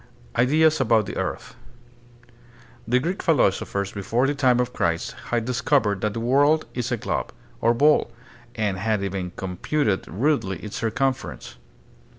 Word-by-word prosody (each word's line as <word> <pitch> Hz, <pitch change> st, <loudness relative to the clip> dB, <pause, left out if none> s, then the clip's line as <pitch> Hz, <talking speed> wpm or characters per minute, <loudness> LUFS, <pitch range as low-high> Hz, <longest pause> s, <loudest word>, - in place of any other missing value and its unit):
Ideas 155 Hz, +4 st, +3 dB
about 110 Hz, -4 st, +2 dB
Hie -, -, -5 dB
Earth. -, -, -4 dB, 1.3 s
The 125 Hz, +2 st, +3 dB
Greek 170 Hz, +9 st, -2 dB
philosophers 100 Hz, -, +1 dB
be 100 Hz, -, -6 dB
fore 115 Hz, +7 st, +1 dB
the 140 Hz, -, +1 dB
time 130 Hz, -4 st, +3 dB
of 125 Hz, 0 st, -1 dB
Christ 85 Hz, 0 st, -1 dB
had 120 Hz, -2 st, -1 dB
discovered 120 Hz, -5 st, +1 dB
that 105 Hz, -1 st, -1 dB
the -, -, -2 dB
world 145 Hz, +6 st, +3 dB
is 125 Hz, 0 st, -3 dB
a 120 Hz, -, +1 dB
globe, -, -, -3 dB, 0.3 s
or 115 Hz, +1 st, +3 dB
ball, 150 Hz, +4 st, +3 dB, 0.4 s
and 105 Hz, -4 st, -1 dB
had 105 Hz, -1 st, 0 dB
even 95 Hz, -2 st, -3 dB
computed 95 Hz, -, -1 dB
rudely 105 Hz, -, 0 dB
its 105 Hz, 0 st, -6 dB
circum 135 Hz, +4 st, +1 dB
ference. 130 Hz, -, -9 dB
120 Hz, 155 wpm, -24 LUFS, 100-135 Hz, 1.3 s, Ideas